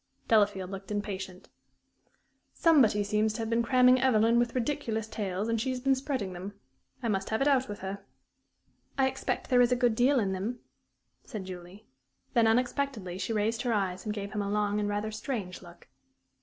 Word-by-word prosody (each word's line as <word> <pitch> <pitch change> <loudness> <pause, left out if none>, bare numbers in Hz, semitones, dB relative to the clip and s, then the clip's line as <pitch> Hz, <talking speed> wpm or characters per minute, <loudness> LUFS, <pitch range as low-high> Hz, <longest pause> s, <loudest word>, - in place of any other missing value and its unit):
Delafield 205 -4 +2
looked 195 0 -8
impatient. 195 -3 -5 1.1
"Somebody 255 -11 +4
seems 210 +1 +1
to 230 - -6
have 225 0 -3
been 230 +1 +3
cramming 250 +1 +5
Evelyn 230 -2 +4
with 240 +1 0
ridiculous 230 -4 -2
tales, 205 -2 -3
and 230 -1 0
she's 255 0 -2
been 270 +2 +2
spreading 260 -8 -3
them. 195 +3 -8 0.4
I - - 0
must 195 -3 -1
have 220 - 0
it 275 - +2
out 265 -3 +2
with 205 - -6
her." 195 +1 -5 0.9
"I 265 -1 +4
expect 265 0 -3
there 250 -1 +6
is 245 0 +4
a - - +4
good 245 -2 +2
deal 255 +4 +3
in 200 -4 0
them," 200 +6 -3 0.7
said 215 -7 -7
Julie. 185 +3 -10 0.5
Then, 230 -2 +4
unexpectedly, 230 -5 0
she 190 +4 -3
raised 225 +2 0
her 245 -2 0
eyes 190 -3 -1
and 215 - -3
gave 200 -1 -5
him 210 - -2
a 200 - -3
long 210 0 0
and 205 0 -1
rather 205 +1 -2
strange 215 -4 -5
look. 175 -1 -15
215 Hz, 185 wpm, -29 LUFS, 200-245 Hz, 1.1 s, there